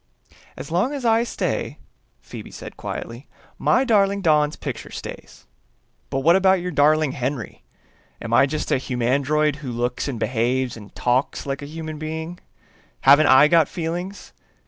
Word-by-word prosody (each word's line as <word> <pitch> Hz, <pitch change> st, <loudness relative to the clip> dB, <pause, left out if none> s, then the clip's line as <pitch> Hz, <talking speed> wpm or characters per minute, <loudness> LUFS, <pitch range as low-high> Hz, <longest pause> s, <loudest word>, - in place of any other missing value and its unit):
"As 145 Hz, -, -8 dB
long 195 Hz, -, +1 dB
as 275 Hz, -4 st, -5 dB
I 225 Hz, 0 st, +4 dB
stay," 240 Hz, -, -3 dB, 0.4 s
Phoebe -, -, -10 dB
said -, -, -10 dB
quietly, -, -, -7 dB, 0.3 s
"my 255 Hz, -, +3 dB
darling 200 Hz, -5 st, +2 dB
Don's 150 Hz, -2 st, +3 dB
picture -, -, -6 dB
stays." -, -, -9 dB, 0.6 s
"But 135 Hz, -, -1 dB
what 170 Hz, +5 st, +5 dB
about 190 Hz, 0 st, +4 dB
your 180 Hz, +1 st, -4 dB
darling 155 Hz, -1 st, +3 dB
Henry? 130 Hz, -4 st, -4 dB, 0.6 s
Am 115 Hz, 0 st, -5 dB
I 135 Hz, +4 st, +5 dB
just 155 Hz, +2 st, -3 dB
a -, -, +4 dB
humandroid 140 Hz, +4 st, 0 dB
who 140 Hz, -4 st, -6 dB
looks 120 Hz, +3 st, -2 dB
and 130 Hz, -5 st, -4 dB
behaves 125 Hz, +2 st, 0 dB
and 105 Hz, -3 st, -13 dB
talks 125 Hz, +2 st, 0 dB
like 140 Hz, +1 st, -3 dB
a 145 Hz, -, -7 dB
human 155 Hz, 0 st, -7 dB
being? 160 Hz, +2 st, -5 dB, 0.6 s
Haven't 140 Hz, +3 st, +6 dB
I 130 Hz, +3 st, +7 dB
got 165 Hz, -1 st, +4 dB
feelings?" 175 Hz, +4 st, -5 dB
150 Hz, 155 wpm, -22 LUFS, 130-170 Hz, 0.6 s, I